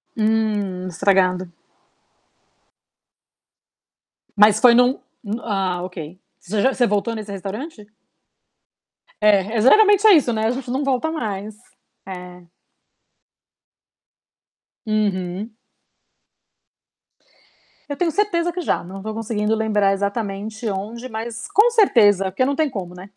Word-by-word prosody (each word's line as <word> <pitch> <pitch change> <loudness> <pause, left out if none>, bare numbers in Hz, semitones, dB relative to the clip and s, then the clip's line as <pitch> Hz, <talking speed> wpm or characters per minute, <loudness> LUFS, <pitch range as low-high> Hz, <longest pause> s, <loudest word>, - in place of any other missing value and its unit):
Hum, 210 -4 -1
estragado. 185 0 +1 2.9
Mas 210 +1 +5
foi 240 0 +6
num 250 +2 +3 0.4
ah 190 -5 -2
ok, 180 -1 -8 0.2
você 200 +2 -3
já 265 0 +2
você 245 - +2
voltou 210 +3 -1
nesse 210 -2 -7
restaurante? 210 - -7 1.3
É 210 +1 +2
é - - +2
geralmente 410 - +5
é 415 - +8
isso, 260 -7 +3
né. 220 0 -1
A - - +1
gente 250 -1 -6
não 270 +3 -1
volta 275 +4 -1
mais 210 -7 -5 0.5
é. 180 -1 -10 2.4
Uhum. 210 0 -2 2.3
Eu 285 - -3
tenho 340 -1 0
certeza 350 -4 0
que 360 - -6
já, 340 - -1
não 190 +2 -9
tô 215 +1 -5
conseguindo 220 -1 -1
lembrar 210 -3 +1
exatamente 205 +2 -4
onde, 220 +6 -5
mas 225 0 -6
com 435 +4 +4
certeza, 210 - +4
porque 200 +7 -1
não 280 +1 -1
tem 310 -1 0
como, 185 -7 -6
né. 185 +2 -12
215 Hz, 115 wpm, -21 LUFS, 195-245 Hz, 2.9 s, é